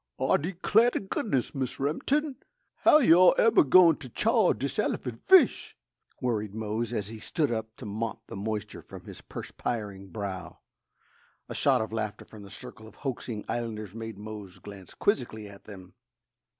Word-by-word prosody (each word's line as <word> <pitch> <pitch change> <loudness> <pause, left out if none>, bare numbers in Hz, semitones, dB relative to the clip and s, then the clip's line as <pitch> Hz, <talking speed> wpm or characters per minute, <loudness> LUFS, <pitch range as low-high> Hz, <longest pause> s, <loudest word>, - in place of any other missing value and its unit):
"Ah - - +2
d'clar' 195 +8 +2
t' - - -2
goodness, 190 - -2
Mis 130 -3 -3
Remin'ton, 265 - 0 0.4
how - - +6
you 245 - +6
all 185 - +7
eber 225 - +5
goin' 165 +3 +6
t' 135 -4 -10
chaw 220 - +3
dis 140 +1 -3
elerphant 120 -3 -2
fish?" 380 -2 +5 0.4
worried 110 -5 -2
Mose, 110 +1 -2
as 105 -4 -3
he 110 -1 -8
stood 145 +4 -1
up 110 -1 -4
to - - -10
mop 110 +2 -4
the - - -9
moisture 105 +1 -4
from - - -12
his - - -10
perspiring 100 -4 -5
brow. 95 -5 -6 0.9
A - - -6
shout - - +2
of 110 0 -4
laughter 110 -2 -4
from 110 - -13
the 100 - -11
circle 110 +2 -11
of - - -16
hoaxing 120 -4 -4
islanders 110 -4 -4
made 115 -2 -7
Mose 105 -3 -9
glance 100 -3 -12
quizzically 115 - -1
at 100 -1 -14
them. 95 -3 -12
115 Hz, 165 wpm, -28 LUFS, 105-145 Hz, 0.9 s, all